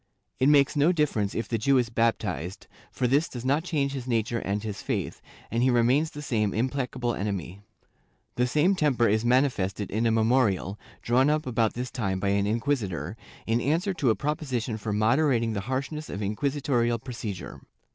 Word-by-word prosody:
It 130 - +4
makes 140 -1 +4
no 150 +4 +4
difference 140 - 0
if 115 - -2
the 115 - -1
Jew 135 +5 +3
is 120 -2 0
baptized, 105 -6 -1 0.3
for 130 - -2
this 140 +6 +2
does 120 -1 -7
not 145 +4 +2
change 145 -6 -1
his 130 -2 -5
nature 115 -1 0
and 100 +2 -2
his 105 -2 -5
faith, - - -3 0.3
and 115 +2 0
he 130 - +4
remains 125 +6 +3
the 150 -1 -8
same 105 -7 0
im 120 +4 +1
placable 125 -3 -2
enemy/ 100 -2 -4 0.7
The 125 +1 +1
same 155 +9 +3
temper 140 -9 +2
is 110 +2 +2
manifested 120 -6 +1
in 110 +3 +1
a - - +3
memorial, 110 -4 +1 0.2
drawn 130 +4 +3
up 155 0 +1
about 115 -3 0
this 125 +1 -4
time 100 -7 -2
by 100 +1 0
an 100 0 +1
inquisitor, 105 - -1 0.3
in 115 +2 +1
answer 170 - +1
to 145 -8 +1
a 110 - +3
propo 150 +1 -2
sition 120 -6 -3
for 105 +1 -4
moderating 115 +2 +2
the 100 - -2
harshness 140 +4 -3
of 100 +3 -4
inquisitorial 120 +1 0
procedure. 115 -6 -7
120 Hz, 185 wpm, -27 LUFS, 110-140 Hz, 0.7 s, It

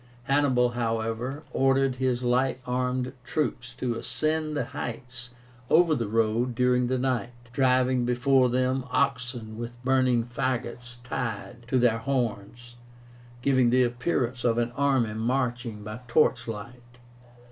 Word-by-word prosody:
Hannibal, 135 -3 +3
however, 115 +4 -2
ordered 135 -1 +2
his 130 -1 0
light 130 +2 +1
armed 125 0 -1
troops 125 -4 -2
to 125 -2 -2
ascend 155 +5 -1
the - - 0
heights 125 +1 -7 0.3
over 165 0 +5
the 115 -7 -1
road 115 +3 +1
during 125 0 +2
the 130 +1 0
night, 125 -1 -1 0.2
driving 130 -1 +3
before 125 +1 +3
them 130 +1 +1
oxen 125 -5 -1
with 120 0 -6
burning 130 -2 +3
fagots 120 0 -4
tied 115 -3 -5
to 130 - +1
their 120 -2 +3
horns, 120 -2 -3 0.7
giving 130 -3 +4
the 125 +1 +4
appearance 125 0 -1
of 115 -1 +2
an 120 0 0
army 130 -4 +1
marching 120 -1 -2
by 105 +2 -6
torchlight. 120 -1 -1
125 Hz, 125 wpm, -27 LUFS, 120-130 Hz, 0.7 s, over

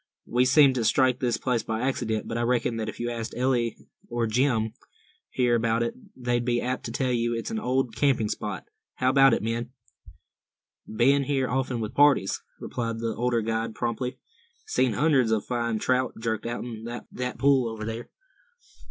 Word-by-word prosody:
"We 125 +1 +2
seemed 140 +1 +6
to 125 -3 -1
strike 130 +2 +3
this 120 -2 0
place 125 -3 0
by 110 0 -3
accident; 120 -4 -1
but 115 - -4
I 120 - 0
reckon 120 -1 +1
that 110 -1 -2
if - - -9
you 120 0 -2
asked 115 -1 -5
Eli 125 -2 +2 0.4
or 120 0 0
Jim 115 -1 +1 0.6
here 125 -1 +1
about 115 0 +2
it, 115 - -2 0.2
they'd 120 -1 -1
be 120 0 +1
apt 125 +1 -3
to - - -4
tell 130 -3 0
you 120 -1 0
it's 115 - -4
an 225 - -1
old 130 - 0
camping 120 -3 +2
spot. 105 -2 -4 0.3
How 130 0 +2
about 135 -2 +6
it, - - -4
men?" 115 +2 -2 1.2
"Be'n 135 +5 +3
here 135 -2 0
often 130 -2 -1
with 110 +2 -4
parties," 140 -9 +4 0.2
replied 115 -2 -3
the 115 0 -2
older 120 -1 +1
guide, 115 0 -2
promptly. 125 +2 -2 0.5
"Seen 130 - +1
hundreds 135 -4 +3
o' 110 - +3
fine 115 0 -2
trout 130 +2 0
jerked 110 -1 -2
outen 120 -1 -5 0.3
thet 125 0 -4
pool 135 -4 +3
over 110 -1 -6
there." 115 +1 -5
120 Hz, 180 wpm, -26 LUFS, 115-130 Hz, 1.2 s, seemed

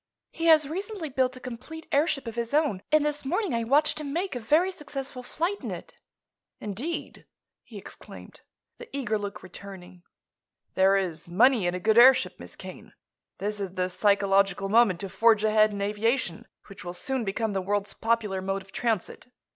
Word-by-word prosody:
He 330 - -4
has 310 -3 +6
recently 380 +1 -4
built 255 -1 0
a - - -10
complete 255 +7 -8
airship 285 -1 +1
of 230 - -5
his 235 +3 -2
own, 295 -12 +1
and 305 -1 +4
this 295 0 -1
morning 365 - -1
I 230 0 0
watched 295 +6 +2
him 285 -2 -5
make 345 0 -2
a - - -2
very 310 +11 +2
successful 275 -6 -6
flight 340 +10 -3
in - - -5
it." - - -8 0.7
"Indeed?" 235 - -5 0.3
he - - -12
exclaimed, - - -11 0.4
the 485 - -10
eager 220 -6 -1
look 205 0 -6
returning. 185 -1 -11 0.7
"There 190 +1 +4
is 170 -4 -3
money 225 +2 +4
in 175 - -1
a - - -3
good 220 +5 +4
airship, 255 +2 +6
Miss - - -10
Kane. - - -11 0.4
This 210 +1 -3
is 195 -2 -5
the 185 0 -1
psychological 195 -1 +2
moment 215 -5 +4
to 195 - -4
forge 220 +1 +3
ahead 215 0 +4
in 200 -1 -3
aviation, 210 -2 -1 0.2
which 195 +1 -12
will 175 0 -6
soon 260 +7 -1
become 215 +1 -2
the 190 - -1
world's 205 +2 -2
popular 225 -4 -1
mode 195 +1 -3
of 195 - -20
transit. 225 0 -2
225 Hz, 180 wpm, -27 LUFS, 195-280 Hz, 0.7 s, has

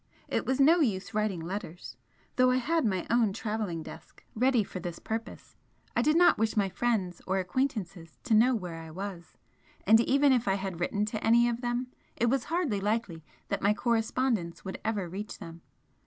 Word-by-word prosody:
It - - -2
was 260 +1 0
no 320 +6 +6
use 205 - 0
writing 210 -5 -1
letters, 175 0 -6 0.4
though 255 0 +4
I 255 - +3
had 315 +4 +1
my 190 -4 0
own 230 -4 +3
travelling 210 -6 -3
desk - - -12
ready 250 0 +3
for 190 - -7
this 175 -1 -5
purpose, 225 +1 -6 0.4
I - - +3
did 305 +2 +3
not 355 -9 +5
wish 225 0 0
my 200 -2 +2
friends 190 -3 -1
or 190 +1 +1
acquaintances 185 - -3
to 235 - 0
know 240 +4 +5
where 175 -6 -5
I 160 - -10
was 180 0 -7 0.5
and 220 +3 +7
even 275 +3 +4
if 245 -4 +1
I 195 - +3
had 190 -3 -4
written 205 +4 0
to 215 0 -4
any 235 +1 +5
of 240 0 -2
them 245 +1 -2 0.3
it 235 -1 +1
was 270 -3 0
hardly 315 - -1
likely 205 -6 -2 0.3
that - - -2
my 205 +2 +3
correspondence 225 -6 -1
would 190 - -5
ever 210 -5 -1
reach 200 +5 -6
them. 165 0 -10
215 Hz, 190 wpm, -29 LUFS, 190-245 Hz, 0.5 s, and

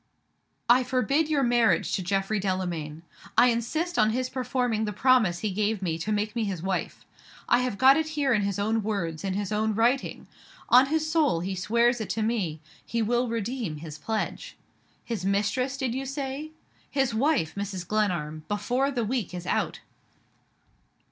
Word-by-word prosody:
"I 250 +2 +6
forbid 275 +5 +1
your 290 -3 +2
marriage 240 -2 +3
to 195 - 0
Geoffrey 195 +3 0
Delamayn! 175 -5 -3 0.3
I 250 - +7
insist 310 +10 -1
on 215 - +5
his 255 +3 -1
performing 250 -4 -1
the 210 - -3
promise 220 -7 +3
he 215 - -1
gave 210 +1 -1
me, 165 -2 -1
to 210 +6 -3
make 210 +1 -1
me 230 - 0
his 190 -5 -3
wife! 190 -1 -3 0.4
I 245 - +4
have 250 -5 -2
got 265 +4 +7
it 320 0 0
here 275 -3 +2
in 210 - +2
his 200 -1 -1
own 220 +2 +1
words, 185 -7 -3
in 190 -1 -2
his 205 -1 -3
own 215 0 0
writing. 240 +5 +1 0.4
On 255 +2 +7
his 310 +1 0
soul, 295 - +2
he 190 +2 -3
swears 235 +5 +2
it 215 - -5
to 220 - -1
me 200 -9 -1 0.2
he 230 -1 -1
will 240 +3 +1
redeem 230 -5 -3
his 150 -1 -9
pledge. 220 +4 -3 0.5
His 225 -6 -4
mistress, 215 +8 0
did 260 -4 -1
you 265 +1 -3
say? 275 +2 -4 0.4
His 270 -4 0
wife, 245 - +1
Mrs. 195 -3 -5
Glenarm, 175 -8 -1
before 245 +7 0
the 245 -5 -1
week 220 -6 -2
is 175 0 -6
out!" - - -1
220 Hz, 175 wpm, -27 LUFS, 195-255 Hz, 0.5 s, I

